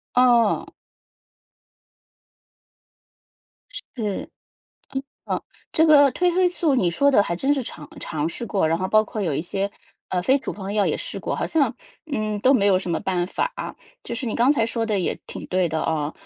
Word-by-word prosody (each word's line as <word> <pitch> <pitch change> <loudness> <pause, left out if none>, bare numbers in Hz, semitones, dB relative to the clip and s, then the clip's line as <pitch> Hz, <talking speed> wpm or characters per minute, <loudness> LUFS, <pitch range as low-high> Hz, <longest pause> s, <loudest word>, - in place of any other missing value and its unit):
哦。 240 -3 +4 3.0
是， - - -7
嗯。 210 -5 -3 1.4
这 320 - +4
个 285 -3 +7
褪 360 0 +2
黑 365 0 +3
素 335 -5 +1
你 185 -8 +2
说 280 +12 +3
的 230 - +6
还 170 -4 -2
真 270 +10 +2
是 275 - -1
尝 155 -10 -8
尝 155 -1 -2
试 170 +8 -5
过， 190 -6 +1
然 165 - +2
后 185 +2 -2
包 215 +2 +4
括 215 0 -5
有 175 -5 0
一 - - -1
些， 195 +3 -2 0.4
呃， 180 - 0
非 260 +10 +3
处 - - -4
方 200 0 -6
药 205 -2 +2
也 - - 0
试 - - -5
过， - - -2
好 - - -1
像， 285 -7 +2 0.4
嗯， 215 -5 -1
都 255 +6 +4
没 210 -7 +3
有 190 -2 +4
什 185 - -5
么 165 - 0
办 180 -2 -1
法。 485 - -2 0.5
就 235 - -5
是 245 - -4
你 225 - -2
刚 250 +4 +4
才 225 -6 +2
说 230 0 -2
的 210 -2 0
也 180 - -1
挺 - - -7
对 185 -2 +1
的 160 0 -1
哦。 155 -2 -1
215 Hz, 205 characters per minute, -23 LUFS, 180-265 Hz, 3.0 s, 个